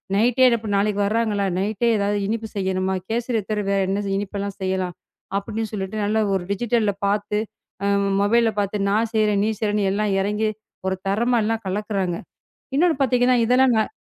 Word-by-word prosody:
நைட்டே 245 +5 +4
இப்ப 220 -1 -6
நாளைக்கு 205 0 +1
வர்றாங்களா, 210 -1 0
நைட்டே 215 +4 0
எதாவது 205 0 0
இனிப்பு 220 +1 -2
செய்யணுமா, 190 -1 0
கேசரிய 230 0 0
தவிர 210 -1 -1
வேற 200 - +2
என்ன 200 +2 -1
இனிப்பு 205 0 -4
எல்லாம் 200 0 -4
செய்யலாம் 185 -2 -1 0.4
அப்பிடின்னு 215 +2 -4
சொல்லிட்டு 195 0 -4
நல்ல 210 +2 +1 0.2
ஒரு 190 - -1
டிஜிட்டல்ல 215 0 +1
பார்த்து, 205 +1 0 0.5
அம் 200 0 +2
மொபைல்ல 230 +2 +3
பார்த்து 200 0 -1
நான் 220 +2 +1
செய்றேன், 210 -2 +3
நீ - - +1
செய்றேன்னு 210 -2 +1
எல்லாம் 210 0 0
இறங்கி 210 +2 0 0.4
ஒரு 190 - +1
தரமா 235 +5 +2
எல்லாம் 225 +1 -1
கலக்குறாங்க. 195 -2 -1 0.6
இன்னொன்னு 325 +2 +3
பார்த்தீங்கன்னா 250 -1 +3
இதெல்லாம் 250 +1 +4
நான் 220 - +1
210 Hz, 160 wpm, -22 LUFS, 200-225 Hz, 0.6 s, நைட்டே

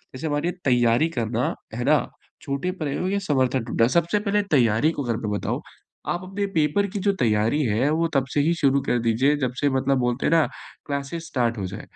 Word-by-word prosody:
जैसे 130 - -6
हमारे 150 +3 0
तैयारी 120 +3 +3
करना, 120 -3 -1 0.2
है 120 - -3
ना? 150 +1 +5 0.4
छोटे 140 +6 -2
प्रयोग 155 +6 -1
या 200 - +1
समर्थन 130 -3 +1
ढूँढना। 115 0 +2
सबसे 170 +9 +1
पहले 205 0 +1
तैयारी 120 +1 +3
को 145 - -4
अगर 120 -3 -1
मैं 105 -3 -3
बताऊँ, 105 - -2 0.5
आप 175 +1 -2
अपने 195 +2 -3
पेपर 160 +6 +2
की - - 0
जो 200 +1 +1
तैयारी 115 +6 +2
है 115 +5 +1
वो 165 +2 +1
तब 135 -1 +3
से - - +2
ही 160 +4 +2
शुरू 140 0 +3
कर 120 - +2
दीजिए, 120 +6 +2
जब 130 -3 -1
से 145 - +3
मतलब 135 0 +1
बोलते 125 +1 -1
हैं - - +1
ना 160 -2 +5 0.4
क्लासेज़ 140 +4 -4
स्टार्ट 120 -7 -1
हो 95 - -2
जाए। - - -7
140 Hz, 210 wpm, -24 LUFS, 120-160 Hz, 0.5 s, ना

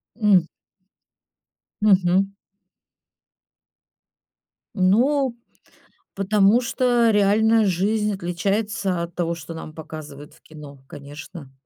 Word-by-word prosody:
М. 200 -7 +3 1.3
Мгм. 195 -1 +3 2.4
Ну, 240 +7 +2 0.8
потому 200 +3 +3
что 240 -1 +1
реальная 215 +2 +3
жизнь 210 +3 0
отличается 195 +1 -2
от 170 0 -9
того, 170 -1 -1
что 165 0 -9
нам 155 -1 -9
показывают 150 -2 -10
в - - -23
кино, 145 -3 -13
конечно. 145 +1 -11
195 Hz, 80 wpm, -22 LUFS, 165-215 Hz, 2.4 s, М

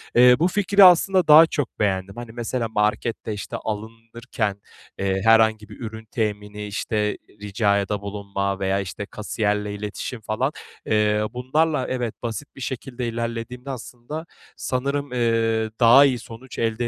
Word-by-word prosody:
eee, 125 +1 +8
bu 170 - +4
fikri, 200 +1 +4
aslında, 185 +1 +6
daha 155 +2 +9
çok 145 -6 -4
beğendim. 100 -1 -1
Hani, 120 -1 -8
mesela, 120 0 -3
markette, 105 +1 -1
işte, 105 - -5
alınırken, 110 -1 -4 0.4
eee, 95 0 0
herhangi 110 -1 +4
bir 105 - -12
ürün 110 -1 -7
temini, 105 -2 -3
işte, 105 +1 -1 0.2
ricada 100 -1 0
bulunma 100 -1 -3
veya, 95 0 0
işte, 100 +1 -5
kasiyerle 105 -1 -2
iletişim 105 +3 -5
falan, 120 +6 -1 0.3
eee, 105 0 +2
bunlarla, 140 +3 0
evet, 125 -3 -3
basit 120 +5 -5
bir 135 - -11
şekilde 125 -1 -4
ilerlediğimde, 115 +3 -4
aslında, 130 +5 -7 0.3
sanırım, 140 +2 -2
eee, 115 -2 +1
daha 125 +4 +8
iyi 125 -3 +1
sonuç 120 +2 -10
elde 115 +1 0
115 Hz, 140 wpm, -23 LUFS, 105-125 Hz, 0.4 s, daha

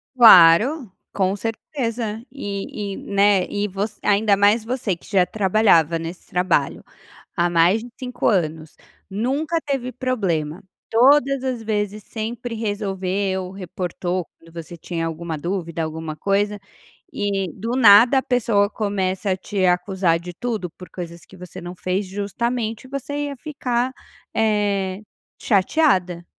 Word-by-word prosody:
Claro, 225 - +7 0.2
com 190 0 +1
certeza. 225 0 -4
E 200 -4 -5
e, - - -7
né, 200 -2 +2
e 205 0 -1
voc 200 +3 -3
ainda 205 0 +3
mais 205 +3 +3
você 225 -5 -2
que - - -17
já 190 -4 +3
trabalhava 190 -5 +3
nesse 165 +2 -7
trabalho, 180 -6 0 0.5
há 175 0 +2
mais 175 +6 +3
de 245 - -10
5 250 -2 -3
anos, 160 -5 0 0.3
nunca 280 - -1
teve 270 -3 -3
problema, 190 -11 -2 0.3
todas 270 +2 +4
as 250 -3 -3
vezes 210 -1 -2
sempre 230 +2 -5
resolveu, 195 -3 -2
reportou 180 -1 -4
quando 165 0 -18
você 170 +1 -8
tinha 165 0 -4
alguma 165 0 -5
dúvida, 170 0 -3
alguma 160 0 -5
coisa, 205 +3 0 0.5
e 195 -4 -1
do 225 +4 -5
nada 235 +2 +7
a - - -6
pessoa 225 -5 +2
começa 200 -2 -1
a 185 - 0
te 195 0 -1
acusar 180 -1 +1
de 175 +1 -8
tudo 220 -3 -3
por 180 - -13
coisas 170 -2 -8
que 190 - -16
você 180 -1 -10
não 175 +1 -7
fez, 185 +2 -2
justamente 220 +4 -3
você 285 +2 -4
ia 280 - -7
ficar, 255 -3 -2 0.4
eh, 205 -3 0 0.4
chateada. 190 - +2
200 Hz, 135 wpm, -22 LUFS, 180-230 Hz, 0.5 s, Claro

